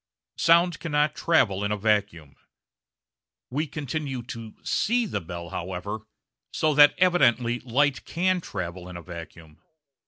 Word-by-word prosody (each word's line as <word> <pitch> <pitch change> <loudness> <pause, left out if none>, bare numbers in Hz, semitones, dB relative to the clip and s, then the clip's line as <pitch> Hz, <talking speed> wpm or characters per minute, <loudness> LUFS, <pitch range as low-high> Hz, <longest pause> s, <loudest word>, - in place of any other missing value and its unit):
Sound 170 -1 +4
cannot 150 -1 +1
travel 110 - +2
in 100 - -1
a 105 - 0
vacuum. 100 -8 -1 1.2
We 150 +5 -1
continue 140 -3 -4
to 115 -2 -8
see 240 +2 +1
the 100 - -3
bell, 85 +1 -7
however, 95 +4 -5 0.5
so 155 -1 +1
that 145 0 +7
evidently 125 -10 +3
light 130 +3 +1
can 185 +1 0
travel 90 - -6
in 90 - -7
a 85 - -10
vacuum. 80 -2 -11
120 Hz, 130 wpm, -26 LUFS, 95-155 Hz, 1.2 s, that